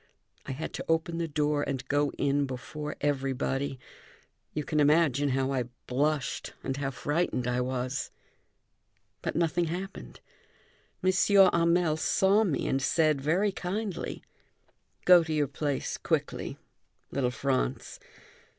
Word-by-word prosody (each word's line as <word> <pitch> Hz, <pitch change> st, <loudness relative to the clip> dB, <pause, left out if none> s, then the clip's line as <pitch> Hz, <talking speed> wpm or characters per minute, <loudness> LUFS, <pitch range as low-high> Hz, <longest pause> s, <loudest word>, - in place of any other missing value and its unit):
I -, -, -3 dB
had 155 Hz, +5 st, -5 dB
to -, -, -5 dB
open 165 Hz, +1 st, +1 dB
the 165 Hz, -, -1 dB
door 150 Hz, -1 st, 0 dB
and 135 Hz, -3 st, -3 dB
go 145 Hz, 0 st, +2 dB
in 140 Hz, 0 st, +1 dB
before 150 Hz, +4 st, -6 dB
everybody. 135 Hz, -1 st, -1 dB, 0.7 s
You 150 Hz, -, -3 dB
can 150 Hz, +2 st, -1 dB
imagine 145 Hz, -2 st, +4 dB
how 135 Hz, 0 st, 0 dB
I 130 Hz, -3 st, 0 dB, 0.2 s
blushed 145 Hz, +2 st, -1 dB
and 135 Hz, -, -2 dB
how 140 Hz, -1 st, -1 dB
frightened 145 Hz, -1 st, -1 dB
I 125 Hz, 0 st, +1 dB
was. 130 Hz, +2 st, -2 dB, 1.1 s
But -, -, -3 dB
nothing 170 Hz, +1 st, +1 dB
happened, 185 Hz, +4 st, -6 dB, 0.8 s
M. 185 Hz, -, +4 dB, 0.4 s
Hamel 170 Hz, -1 st, +3 dB
saw 195 Hz, +6 st, +3 dB
me 175 Hz, -9 st, -1 dB
and 135 Hz, -, 0 dB
said 155 Hz, 0 st, +2 dB
very 180 Hz, +8 st, +2 dB
kindly: 195 Hz, 0 st, -4 dB, 0.8 s
"Go 180 Hz, -2 st, +8 dB
to 160 Hz, -, -5 dB
your 150 Hz, -2 st, +1 dB
place 145 Hz, 0 st, -2 dB
quickly, -, -, -2 dB, 0.5 s
little 130 Hz, -3 st, +1 dB
Franz. 125 Hz, -, -2 dB
145 Hz, 130 wpm, -29 LUFS, 135-165 Hz, 1.1 s, Go